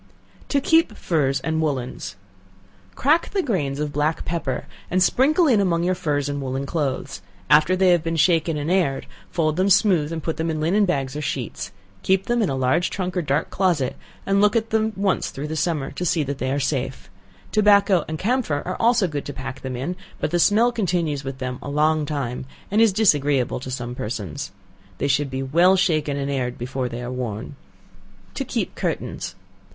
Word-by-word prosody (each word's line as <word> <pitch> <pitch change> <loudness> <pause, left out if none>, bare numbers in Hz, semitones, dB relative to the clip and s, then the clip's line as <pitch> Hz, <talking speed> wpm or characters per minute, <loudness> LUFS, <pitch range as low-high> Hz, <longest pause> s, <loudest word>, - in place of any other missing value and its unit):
To 280 - +2
Keep 320 -5 +3
Furs 140 -5 +1
and 160 +2 -1
Woollens. 130 -8 -3 0.8
Crack 310 +5 +2
the 390 -2 0
grains 145 - -1
of 150 -1 -2
black 150 +2 0
pepper, 150 -6 -2 0.2
and 185 +1 +3
sprinkle 300 - +3
in 235 -9 +4
among 170 -3 +1
your 180 +1 +2
furs 150 -6 -1
and 145 0 -3
woollen 135 +1 -3
clothes; 135 -6 -3 0.3
after 155 +5 +6
they 185 0 +4
have 175 -2 +4
been 165 +1 -2
shaken 165 0 +2
and 150 +3 -2
aired, 175 -8 +1 0.2
fold 155 -2 0
them 190 +2 +2
smooth 180 -6 +4
and 160 -2 -4
put 160 - -2
them 165 +1 -1
in 155 -1 -2
linen 190 +7 +3
bags 135 -7 -1
or 150 - -3
sheets; 130 -5 -4 0.3
keep 190 0 +2
them 240 0 +1
in 205 - +1
a 135 - -1
large 130 +7 +1
trunk 185 -1 -3
or 180 - +1
dark 145 -2 -1
closet, 175 -9 +1 0.3
and 195 0 +2
look 210 +1 +4
at 225 -1 0
them 220 0 +2
once 195 -1 0
through 145 +2 -5
the 155 - -4
summer 150 -3 -1
to - - -5
see 165 -2 +1
that 140 0 -4
they 130 +1 -1
are 140 - 0
safe. 135 -2 -2 0.4
Tobacco 200 -4 +4
and 155 - -4
camphor 215 - 0
are 185 - -3
also 230 -4 +3
good 145 -3 -4
to 145 - -5
pack 135 0 -7
them 130 -1 -4
in, 135 +9 -3 0.2
but - - -1
the 175 - +1
smell 220 +7 +4
continues 175 - -1
with 135 -1 -5
them 125 -1 -4
a - - -6
long 150 +1 +2
time, 130 -4 -3 0.2
and 210 +2 +3
is 225 -2 +6
disagreeable 145 - +2
to 130 - -7
some 120 -1 -4
persons. 105 -9 -5 0.5
They 140 - -1
should 140 +1 +1
be 130 0 -3
well 170 +8 +4
shaken 155 -6 +1
and 140 0 -2
aired 125 -3 -2
before 125 +1 -3
they 120 +1 -6
are 120 - -4
worn. 125 0 -5 0.8
To - - -2
Keep - - -3
Curtains. - - -3
155 Hz, 200 wpm, -23 LUFS, 135-185 Hz, 0.8 s, after